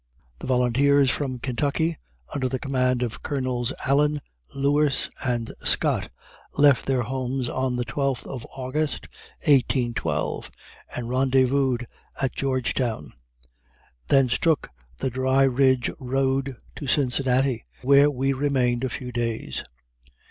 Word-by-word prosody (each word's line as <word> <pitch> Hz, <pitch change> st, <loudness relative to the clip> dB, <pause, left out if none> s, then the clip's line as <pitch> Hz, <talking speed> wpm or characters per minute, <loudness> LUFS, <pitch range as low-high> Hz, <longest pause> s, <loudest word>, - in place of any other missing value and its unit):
The -, -, -7 dB
volunteers 130 Hz, +2 st, +3 dB
from 130 Hz, +1 st, -2 dB
Kentucky, 145 Hz, +6 st, -1 dB, 0.3 s
under 130 Hz, -2 st, -1 dB
the 130 Hz, -, -1 dB
command 125 Hz, -2 st, 0 dB
of 115 Hz, -2 st, -4 dB
Colonels 130 Hz, -3 st, -1 dB
Allen, 145 Hz, +2 st, +2 dB, 0.4 s
Lewis 140 Hz, +1 st, +1 dB
and 120 Hz, -3 st, -1 dB
Scott, -, -, +3 dB, 0.5 s
left 140 Hz, -2 st, +5 dB
their 130 Hz, -2 st, +1 dB
homes 130 Hz, +1 st, -2 dB
on 130 Hz, 0 st, -1 dB
the 120 Hz, 0 st, -1 dB
12th 135 Hz, +2 st, -2 dB
of 130 Hz, -4 st, -6 dB
August, 140 Hz, +4 st, -3 dB, 0.4 s
1812, 120 Hz, -, +1 dB, 0.5 s
and 120 Hz, -1 st, -4 dB
rendezvoused 130 Hz, 0 st, +2 dB, 0.4 s
at 135 Hz, -2 st, 0 dB
Georgetown. 130 Hz, -, -1 dB, 0.9 s
Thence 130 Hz, -3 st, +3 dB
took 160 Hz, -4 st, +1 dB, 0.3 s
the 130 Hz, -, -2 dB
Dry 130 Hz, +2 st, +2 dB
Ridge 130 Hz, -2 st, +3 dB
road 135 Hz, +1 st, 0 dB, 0.2 s
to 145 Hz, -, -6 dB
Cincinnati, 130 Hz, -3 st, +1 dB, 0.2 s
where 140 Hz, +2 st, +6 dB
we 135 Hz, 0 st, 0 dB
remained 130 Hz, -3 st, +1 dB
a 130 Hz, -, 0 dB
few 125 Hz, 0 st, -6 dB
days. 115 Hz, -, -3 dB
130 Hz, 120 wpm, -24 LUFS, 125-140 Hz, 0.9 s, where